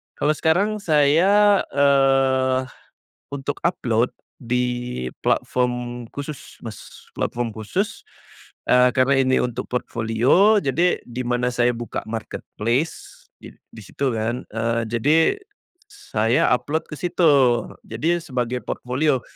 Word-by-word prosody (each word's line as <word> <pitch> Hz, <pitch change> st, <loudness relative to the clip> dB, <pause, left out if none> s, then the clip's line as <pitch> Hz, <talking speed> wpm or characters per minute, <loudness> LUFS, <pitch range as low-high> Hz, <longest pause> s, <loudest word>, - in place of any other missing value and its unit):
kalau 150 Hz, -, +1 dB
sekarang 195 Hz, +8 st, +1 dB
saya, 185 Hz, +7 st, +4 dB, 0.2 s
eee, 135 Hz, -2 st, +3 dB, 0.7 s
untuk 140 Hz, 0 st, -4 dB
upload, 120 Hz, -8 st, +1 dB, 0.3 s
di 125 Hz, -, -2 dB, 0.2 s
platform 125 Hz, -1 st, -1 dB
khusus, 145 Hz, 0 st, -8 dB
Mas. 110 Hz, -4 st, -11 dB
Platform 120 Hz, -1 st, -2 dB
khusus, 180 Hz, -, -3 dB, 0.7 s
eee, 125 Hz, 0 st, +6 dB
karena 130 Hz, +2 st, +3 dB
ini 130 Hz, 0 st, +2 dB
untuk 125 Hz, 0 st, -3 dB
portofolio, 125 Hz, -, +2 dB
jadi 170 Hz, +6 st, +1 dB
di 120 Hz, +1 st, -6 dB
mana 125 Hz, 0 st, 0 dB
saya 120 Hz, 0 st, +2 dB
buka 120 Hz, 0 st, -5 dB
marketplace, 115 Hz, +5 st, -4 dB
di -, -, -12 dB, 0.2 s
di 110 Hz, -, -11 dB
situ 130 Hz, +7 st, -2 dB
kan, 115 Hz, +3 st, -2 dB
eee, 115 Hz, +1 st, -1 dB
jadi 120 Hz, +7 st, +2 dB, 0.7 s
saya 115 Hz, -, 0 dB
upload 145 Hz, +5 st, -1 dB
ke -, -, -6 dB
situ. 175 Hz, 0 st, 0 dB, 0.6 s
Jadi, 160 Hz, +10 st, 0 dB
sebagai 125 Hz, -4 st, -2 dB
portofolio. 130 Hz, +4 st, -1 dB
125 Hz, 110 wpm, -22 LUFS, 120-150 Hz, 0.7 s, eee